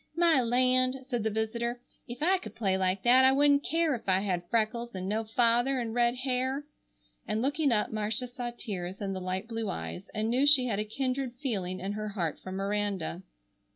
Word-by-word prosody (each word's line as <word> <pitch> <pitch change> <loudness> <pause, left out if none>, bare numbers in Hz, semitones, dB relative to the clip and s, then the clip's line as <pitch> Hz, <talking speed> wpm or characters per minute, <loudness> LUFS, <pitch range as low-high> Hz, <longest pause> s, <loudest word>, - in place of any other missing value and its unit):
"My 335 -5 +4
land!" 255 +2 +2
said 250 -3 -2
the 220 - +1
visitor, 235 +3 -2 0.3
"'f 245 +4 -5
I 375 +3 +3
could 215 - -10
play 195 -5 +1
like 190 0 0
that 250 +2 +6
I 260 - +7
wouldn't 285 +1 +4
care 325 -2 +1
ef 230 -5 -4
I 190 0 +3
had 180 -3 -2
freckles 235 0 -1
and 185 0 -4
no 215 +3 -1
father 240 +4 +2
and 230 -2 -3
red 240 0 +2
hair," 260 +2 -1 0.6
and 215 - -1
looking 285 +3 +1
up 210 -2 +1
Marcia 215 +3 -1
saw 245 0 -5
tears 190 -6 -6
in 195 -1 -3
the 185 - -5
light 185 +3 -3
blue 225 -2 -3
eyes, 190 +1 -6
and 220 +1 -1
knew 265 +4 +3
she 275 -3 +7
had 215 -5 -1
a 210 - -1
kindred 255 +2 -2
feeling 195 -9 -3
in 190 +2 -3
her 215 +1 -4
heart 175 -7 -3
for 185 - -8
Miranda. 195 -3 -2
230 Hz, 205 wpm, -29 LUFS, 200-255 Hz, 0.6 s, I